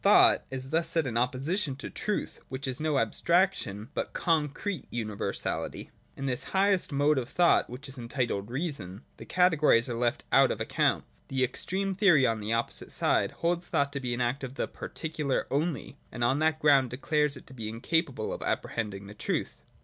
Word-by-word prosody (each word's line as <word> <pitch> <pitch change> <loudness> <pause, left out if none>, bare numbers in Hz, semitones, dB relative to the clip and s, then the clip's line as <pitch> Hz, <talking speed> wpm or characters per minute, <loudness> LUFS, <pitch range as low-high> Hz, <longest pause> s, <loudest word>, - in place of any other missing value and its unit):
Thought - - +6
is 130 +1 -6
thus 165 +1 +2
set 165 -3 +1
in 120 -4 -3
opposition 135 - 0
to 145 - -6
Truth, 210 - -3
which 130 +1 -4
is 130 +2 -2
no 155 -1 0
abstrac 180 +7 +3
tion, 105 +5 -6
but - - -3
concrete 165 +2 -1
universality. 110 -3 -3 0.3
In 135 - -4
this 125 -2 +1
highest 195 -3 +4
mode 145 +1 +3
of 125 -1 -5
thought, 175 -1 +3
which 130 +4 -8
is 135 -1 -7
entitled 115 -4 -2
Reason, 125 - -4
the - - -10
Categories 155 -10 +4
are 120 - -3
left 120 0 0
out - - +6
of - - -2
account. - - +1
— - - -36
The 130 -1 0
extreme 190 +9 -1
theory 180 -8 +5
on 115 -2 +1
the 105 0 -5
oppo 115 +1 0
site - - -4
side - - +2 0.2
holds 175 +1 +1
thought 140 0 0
to 140 - -2
be 125 -3 -2
an 120 - -3
act 125 +3 -1
of 135 0 -6
the - - -1
particular 150 -4 -3
only, 145 -1 -2
and 120 - -3
on 130 +4 +2
that 155 0 +2
ground 140 -4 +4
declares 150 +3 0
it 130 - -13
incapable 120 +4 -1
of - - -6
appre - - -1
hending 105 -4 -4
the 100 - -10
Truth. 105 - -3
135 Hz, 195 wpm, -29 LUFS, 120-160 Hz, 0.3 s, Thought